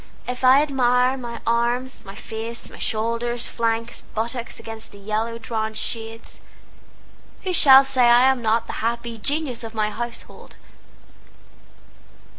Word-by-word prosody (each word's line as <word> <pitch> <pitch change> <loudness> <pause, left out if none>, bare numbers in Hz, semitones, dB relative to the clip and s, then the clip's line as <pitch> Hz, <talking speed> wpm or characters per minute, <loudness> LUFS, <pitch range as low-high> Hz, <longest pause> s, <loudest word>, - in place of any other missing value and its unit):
If 250 +1 -4
I 260 +3 +7
admire 255 -2 +2
my 235 -3 -7
arms, 240 +3 0
my 195 -1 -10
face, 225 +2 -6
my - - -12
shoulders, 235 +2 -1
flanks, 230 0 -2
buttocks 235 +2 -3
against 225 0 -7
the - - -13
yellow 215 +3 -2
drawn 220 -1 -3
shades, 225 0 -4 1.0
Who 370 -1 -1
shall 270 -5 +8
say 265 -2 +2
I 240 +2 +6
am 260 -2 -2
not 225 0 +1
the - - -6
happy 235 0 -2
genius 280 -1 -1
of 225 0 -8
my 215 -1 0
household? 235 +2 -7
235 Hz, 135 wpm, -23 LUFS, 225-250 Hz, 1.0 s, shall